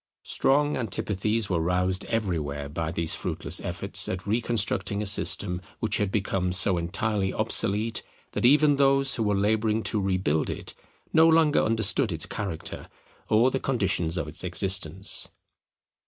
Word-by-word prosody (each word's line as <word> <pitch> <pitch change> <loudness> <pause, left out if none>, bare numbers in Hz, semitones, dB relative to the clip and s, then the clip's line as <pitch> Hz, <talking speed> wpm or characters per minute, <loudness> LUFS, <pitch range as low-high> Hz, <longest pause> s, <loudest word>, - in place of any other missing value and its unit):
Strong 145 +2 +2
antipathies 105 -1 -2
were 90 -4 0
roused 90 +3 0
everywhere 80 -11 -2
by 80 +2 -4
these 85 -1 -1
fruitless - - -1
efforts - - 0
at 95 +1 -4
reconstructing 110 -2 0
a 105 - -2
system 90 -1 +1 0.2
which - - +1
had 100 -2 -1
become 95 -3 -1
so 95 +1 +2
entirely 95 +3 -1
obsolete, 110 0 +2 0.3
that - - -4
even 145 +3 +5
those 135 -1 +3
who - - -3
were 105 -2 +1
labouring 110 +2 +1
to 105 - -1
rebuild 95 -5 0
it - - -5 0.4
no 160 0 +6
longer 160 -2 +4
understood 110 +1 +1
its 80 -2 -1
character 95 -6 -6 0.4
or 115 +4 +4
the 135 - -1
conditions 95 -10 -1
of 80 -4 -3
its 80 +4 -6
existence. 95 +1 0
100 Hz, 145 wpm, -26 LUFS, 90-115 Hz, 0.4 s, no